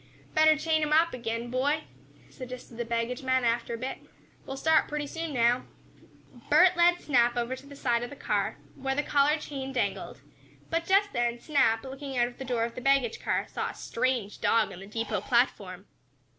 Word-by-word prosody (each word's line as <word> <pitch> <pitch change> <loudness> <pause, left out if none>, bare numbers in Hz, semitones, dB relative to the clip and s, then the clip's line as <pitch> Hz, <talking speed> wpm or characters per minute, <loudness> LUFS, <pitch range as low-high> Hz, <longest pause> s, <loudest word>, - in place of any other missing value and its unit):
"Better 310 0 +5
chain 315 +1 +1
him 300 0 -1
up 325 +2 +4
again, 230 -2 -3
my - - -8
boy," 285 +5 0 0.5
suggested 250 -2 -9
the 240 - -2
baggage 235 +1 -2
man, 260 -1 +1
after 235 0 0
a - - -6
bit. 255 +3 -5 0.5
"We'll 270 - -5
start 320 +3 +3
pretty 295 0 -3
soon 325 +2 -5
now." 245 -1 +2 0.8
Bert 365 0 +6
led 345 0 +4
Snap 240 -3 +2
over 240 +2 -1
to 265 +2 -14
the 285 - -11
side 240 -4 0
of 240 - -4
the 285 - -9
car, - - -1 0.2
where 270 0 -3
the 295 - 0
collar 290 +1 +3
chain 275 -3 -6
dangled, 255 - -3 0.5
but, 330 0 0
just 400 +1 +3
then, 240 -1 0
Snap, 230 -6 +2
looking 270 0 -6
out 240 - +4
of 245 - -12
the 265 - -5
door 245 -3 0
of 230 0 -3
the - - -7
baggage 275 -3 +2
car, - - 0
saw - - -3
a - - -9
strange 245 -4 -2
dog 225 -3 +2
on 180 - -9
the 195 - -10
depot 215 -2 -2
platform. 200 -6 0
255 Hz, 200 wpm, -28 LUFS, 235-295 Hz, 0.8 s, Bert